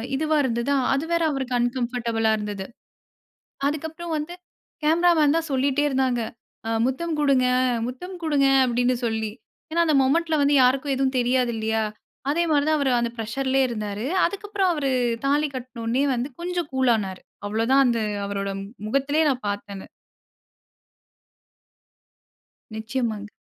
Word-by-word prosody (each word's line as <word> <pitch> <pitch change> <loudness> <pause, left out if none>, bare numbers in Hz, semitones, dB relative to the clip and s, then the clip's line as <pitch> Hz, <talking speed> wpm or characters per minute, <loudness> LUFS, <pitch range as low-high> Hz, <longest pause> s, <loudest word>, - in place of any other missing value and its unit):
இதுவா 310 +2 +1
இருந்தது. 235 +1 -1 0.2
அது 280 +4 0
வேற 335 - +2
அவருக்கு 265 -3 -2
அன்கம்ஃபர்டபுளா 240 -2 0
இருந்தது. 205 -2 -5 1.0
அதுக்கு 300 +2 -2
அப்புறம் 335 +1 -6
வந்து 305 +3 -5 0.5
கேமரா 335 +3 +4
மேன் 300 0 +4
தான் 330 0 -2
சொல்லிட்டே 275 +2 +1
இருந்தாங்க. 260 -3 +1 0.5
அ - - -1 0.2
''முத்தம் 315 +6 -1
குடுங்க, 275 -4 +3 0.4
முத்தம் 360 +10 -7
குடுங்க'' 275 -3 +3
அப்டின் 245 +1 +1
சொல்லி. 220 -2 -1 0.4
ஏனா, 335 - 0
அந்த 310 -2 +2
மொமெண்ட்ல 320 +4 +2
வந்து 285 +1 +3
யாருக்கும் 270 +2 +2
எதும் 265 0 0
தெரியாது 245 0 +1
இல்லையா? 220 0 0 0.5
அதே 330 +4 +2
மாரி 290 -1 +3
தான் 310 0 +3
அவரு 275 -2 +1
அந்த 235 0 0
பிரஷர்லேயே 265 +4 0
இருந்தாரு. 210 -1 -4 0.2
அதுக்கு 400 +3 -4
அப்புறம் 390 -3 +2
அவரு 285 -4 -1 0.3
தாலி 290 +2 +2
கட்னோனே 245 0 -2
வந்து 250 +2 -2
கொஞ்சம் 350 -3 -2
கூல்லானாரு. 225 -8 +1 0.3
அவ்வளோதான் 230 +6 +3
அந்த 235 -2 +2 0.3
அவரோட 200 0 -3 0.4
முகத்திலேயே 275 +6 +1
நான் 255 -5 -2
பார்த்தது. 200 -1 -6 2.9
நிச்சியமாங்க. 220 -2 -3
265 Hz, 135 wpm, -24 LUFS, 235-295 Hz, 2.9 s, கேமரா